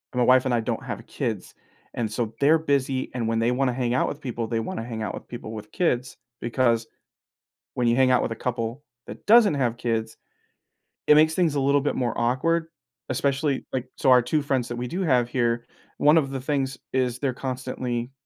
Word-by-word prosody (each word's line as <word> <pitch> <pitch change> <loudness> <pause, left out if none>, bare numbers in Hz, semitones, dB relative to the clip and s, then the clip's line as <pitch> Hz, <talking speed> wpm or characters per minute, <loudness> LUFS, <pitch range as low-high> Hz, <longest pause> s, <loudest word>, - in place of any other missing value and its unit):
My 125 - +3
wife 130 +1 +5
and 130 - +1
I 120 - +2
don't 110 - -3
have - - -6
kids, - - -4 0.4
and 110 -3 -2
so 110 -1 -2
they're 155 +3 +5
busy, 135 -3 0
and 120 -3 -2
when 115 0 0
they 115 +2 +2
wanna 125 0 +1
hang 120 -1 -1
out 130 - +2
with 145 - -6
people, 120 -3 -3
they 115 0 -1
wanna 115 0 -4
hang 115 -2 -5
out - - -3
with - - -9
people 120 -2 -7
with 105 -1 -8
kids 130 -8 -1 0.2
because 115 -1 +1 0.9
when 125 - 0
you 120 - +3
hang 130 -1 +4
out 125 - +4
with - - -2
a - - -5
couple 120 +2 -3 0.2
that - - -10
doesn't 215 -4 +6
have 125 -4 0
kids, 115 -2 -2 0.9
it 150 - +7
makes 155 +1 +5
things 170 -5 +2
a - - +1
little 140 +1 +3
bit 145 - -1
more 120 -3 -1
awkward, 160 +8 +1 0.4
especially, 140 +2 0
like 130 -1 -2
so, 135 - +2
our 125 -1 +7
2 135 +6 0
friends 135 -4 -1
that 120 - -5
we 120 +1 -4
do 180 +10 -3
have 125 -9 +2
here, 120 -1 0 0.3
one 150 +3 +5
of 140 -4 +2
the 135 -1 -4
things 135 -1 -1 0.2
is 125 -2 0
they're 135 -3 -1
constantly, 125 -1 -4
125 Hz, 215 wpm, -25 LUFS, 120-140 Hz, 0.9 s, it